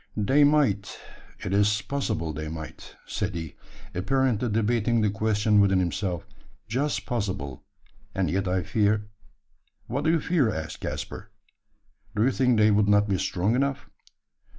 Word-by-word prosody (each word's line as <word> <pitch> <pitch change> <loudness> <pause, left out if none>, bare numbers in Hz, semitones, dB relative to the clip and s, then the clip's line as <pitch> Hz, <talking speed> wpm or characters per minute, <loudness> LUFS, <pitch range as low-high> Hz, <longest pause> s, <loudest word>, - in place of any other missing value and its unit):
"They 135 +8 +4
might 135 -10 +2 0.5
it 95 - -2
is 105 +1 +3
possible 110 - -2
they 75 +2 -5
might," 80 0 -8
said - - -3
he, 80 -3 -5 0.4
apparently 125 +3 +1
debating 115 +1 +1
the 105 -2 +2
question 105 0 +2
within 95 -1 +4
himself 90 +1 -1 0.4
"just 135 +7 -1
possible; 95 - -3 0.5
and - - +1
yet 95 +1 -1
I 90 0 0
fear 105 -1 +1 0.4
" - - -44
"What 140 +6 -3
do - - +3
you 165 0 +3
fear?" 155 -8 +2
asked 80 -3 -5
Caspar. - - -5 0.9
"Do 105 - +2
you 130 - +3
think 125 -3 +2
they 105 0 +5
would 105 0 +3
not 105 0 +4
be 95 -3 0
strong 95 +3 0
enough?" 140 +1 -1
105 Hz, 150 wpm, -26 LUFS, 95-125 Hz, 0.9 s, they